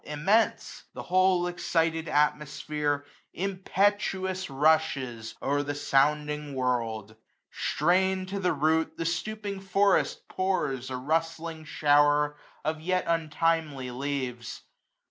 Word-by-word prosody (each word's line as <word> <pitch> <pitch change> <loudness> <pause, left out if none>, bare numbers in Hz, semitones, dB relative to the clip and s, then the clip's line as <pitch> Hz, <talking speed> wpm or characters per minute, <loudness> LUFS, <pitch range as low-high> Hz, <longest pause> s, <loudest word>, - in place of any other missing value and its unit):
Immense! 190 +10 0
the - - -6
whole 185 -1 +3
excited 165 -2 0
atmosphere 150 0 0 0.3
Impetuous 190 0 0
rushes 135 -6 +1
o*er 145 +1 +1
the 145 0 -3
sounding 150 +1 +1
world; 115 -4 -2 0.4
Strain'd 185 +3 +1
to 200 +1 -3
the 180 -2 +1
root, 160 +2 +1
the 165 - -3
stopping 200 +4 -3
forest 195 +1 +1
pours 160 -9 -1
320 130 -1 -4
A 130 - -12
rustling 165 0 -1
shower 145 0 +3 0.3
of 155 0 -1
yet 185 +2 0
untimely 160 -4 0
leaves. 125 -2 -4
155 Hz, 105 wpm, -28 LUFS, 145-185 Hz, 0.4 s, whole